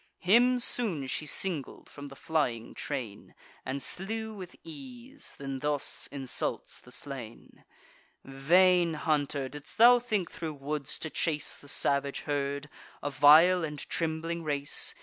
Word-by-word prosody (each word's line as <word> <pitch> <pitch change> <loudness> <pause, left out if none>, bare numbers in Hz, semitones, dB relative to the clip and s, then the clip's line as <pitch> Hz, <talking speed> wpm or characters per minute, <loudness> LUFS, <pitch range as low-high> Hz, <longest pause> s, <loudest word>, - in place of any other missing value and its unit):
Him 240 +7 +4
soon 220 - 0
she 150 +3 -3
singled 165 -4 -2
from 145 0 -10
the 135 - -11
flying 125 -8 -1
train, 120 -8 -6 0.3
And 135 0 -4
slew 220 +7 -1
with 185 -4 -9
ease; 250 - -8
then 135 -1 -5
thus 145 0 0
insults 135 -3 -3
the - - -17
slain: 125 -4 -9 0.6
"Vain 170 +5 +3
hunter, 145 -3 0
didst 145 +2 -10
thou 240 +2 +8
think 215 -7 -2
thro' 160 -2 -5
woods 145 0 -2
to 160 - -5
chase 150 0 -1
The 145 - -14
savage 140 0 0
herd, 140 -1 -2 0.4
a 145 - -2
vile 160 +6 +7
and 150 -2 -4
trembling 165 +1 -2
race? 145 -2 0
150 Hz, 135 wpm, -29 LUFS, 140-180 Hz, 0.6 s, thou